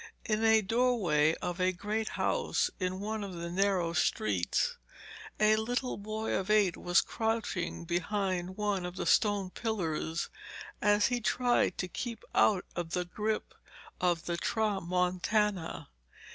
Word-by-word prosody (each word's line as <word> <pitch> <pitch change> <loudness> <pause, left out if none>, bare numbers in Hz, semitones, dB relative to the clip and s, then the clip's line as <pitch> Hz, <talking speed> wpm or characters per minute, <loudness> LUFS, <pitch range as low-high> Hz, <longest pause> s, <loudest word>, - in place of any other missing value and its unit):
In 215 -1 0
a 220 -1 +5
doorway 195 -9 +2
of 180 +1 -2
a 185 0 +3
great 210 +4 -2
house, - - +1
in 185 0 -2
one 215 +1 -3
of 195 -3 -6
the 170 0 -5
narrow 185 -2 +1
streets, 105 - +1 0.6
a 215 0 +5
little 245 +3 -1
boy 215 +2 -3
of 190 +1 -1
eight 210 -5 +4
was 175 0 +3
crouching 220 -6 -2
behind 185 +1 -1
one 205 -3 0
of 180 0 -5
the - - -3
stone 205 -3 +2
pillars 170 -7 -2 0.5
as 205 0 +4
he 245 -1 -1
tried 245 -4 +2
to 180 - -2
keep 230 +5 -5
out 195 -4 +4
of 170 -1 -4
the 180 0 0
grip 215 +4 -2 0.5
of 175 -2 +1
the 170 -1 -2
tramontana. 185 -2 0
195 Hz, 140 wpm, -31 LUFS, 175-215 Hz, 0.6 s, a